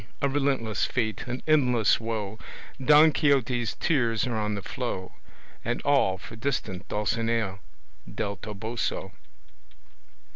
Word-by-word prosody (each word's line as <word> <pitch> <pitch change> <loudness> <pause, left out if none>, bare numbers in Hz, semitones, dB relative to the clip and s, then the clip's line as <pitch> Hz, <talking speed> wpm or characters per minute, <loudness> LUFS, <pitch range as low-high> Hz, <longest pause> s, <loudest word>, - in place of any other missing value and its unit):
a 140 - +2
Relentless 135 -6 0
fate, 110 -2 -2
an 125 +1 -4
endless 125 -8 +4
woe; 110 -2 -4 0.4
Don 150 +3 +7
Quixote's 130 -4 +1
tears 120 -8 +2
are 120 -3 -2
on 105 -1 -1
the 100 - -5
flow, 120 -8 -4 0.5
And 120 +1 -1
all 135 -10 +3
for 100 - -10
distant 110 -7 -3
Dulcinea 110 -1 -1 0.5
Del 100 -3 -3
Toboso. 105 -1 -4
115 Hz, 115 wpm, -27 LUFS, 105-135 Hz, 0.5 s, Don